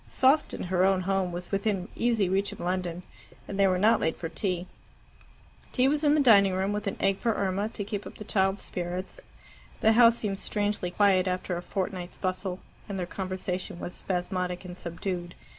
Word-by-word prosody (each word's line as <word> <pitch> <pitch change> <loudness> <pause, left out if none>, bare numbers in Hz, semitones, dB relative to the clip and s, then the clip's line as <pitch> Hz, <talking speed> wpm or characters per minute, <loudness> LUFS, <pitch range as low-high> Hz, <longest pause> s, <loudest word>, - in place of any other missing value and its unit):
Sawston, 275 +4 +3
her 180 0 +1
own 190 -1 +3
home, 190 -1 0
was 175 0 -6
within 195 -2 0
easy 230 -5 +2
reach 195 +2 0
of - - -10
London, 180 -1 -2 0.4
and 200 - -5
they 195 - +6
were 185 -1 +2
not 215 +5 +4
late 160 - 0
for 165 - -4
tea. 180 +1 -2 1.1
Tea 255 0 +4
was 295 +2 +1
in 295 0 +5
the - - +3
dining 200 -8 +6
room, 190 +2 0
with 210 0 -3
an 200 - -2
egg 195 0 +1
for 230 -2 +1
Irma, 195 +2 0
to 205 - -5
keep 205 0 -4
up - - -11
the - - -7
child's 195 -2 +1
spirits. 180 +1 -4 0.6
The 220 - +5
house 230 0 +6
seemed 200 -4 -2
strangely 205 -3 -1
quiet 185 0 +3
after 180 0 -1
a 175 - -3
fortnight's 185 -1 -4
bustle, 185 0 -2 0.3
and 200 - -3
their 180 - -2
conversation 185 -1 -4
was 175 - -6
spasmodic 180 0 -3
and 180 -1 -7
subdued. 175 0 -4
190 Hz, 190 wpm, -28 LUFS, 180-205 Hz, 1.1 s, they